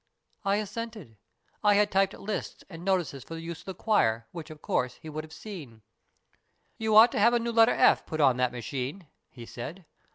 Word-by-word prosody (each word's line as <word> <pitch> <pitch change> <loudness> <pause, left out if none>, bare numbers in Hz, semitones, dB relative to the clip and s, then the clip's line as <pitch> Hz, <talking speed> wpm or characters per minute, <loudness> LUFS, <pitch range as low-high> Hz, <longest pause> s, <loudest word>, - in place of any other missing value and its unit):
" - - -43
I 200 -1 +2
assented. 210 - -5 0.5
I 205 -1 +5
had 205 0 +3
typed 195 0 +2
lists 210 0 -5
and 165 0 -9
notices 180 -8 0
for 165 - -8
the 165 - -6
use 165 0 -6
of - - -16
the 190 - -6
choir, 115 - +1
which, 165 -1 -8
of 155 -1 -10
course, 125 0 0
he 160 - -11
would 155 0 -5
have 155 - -13
seen. 150 - -10 1.0
"'You 220 -1 +1
ought 225 +2 +9
to - - -1
have 235 +4 +5
a - - +3
new 235 0 -2
letter 230 +1 +5
"f" - - +4
put 155 - -4
on 135 -4 +4
that 125 -1 +1
machine,' 130 - -5 0.2
he 120 -3 -11
said. 155 +11 -8
170 Hz, 215 wpm, -28 LUFS, 135-210 Hz, 1.0 s, ought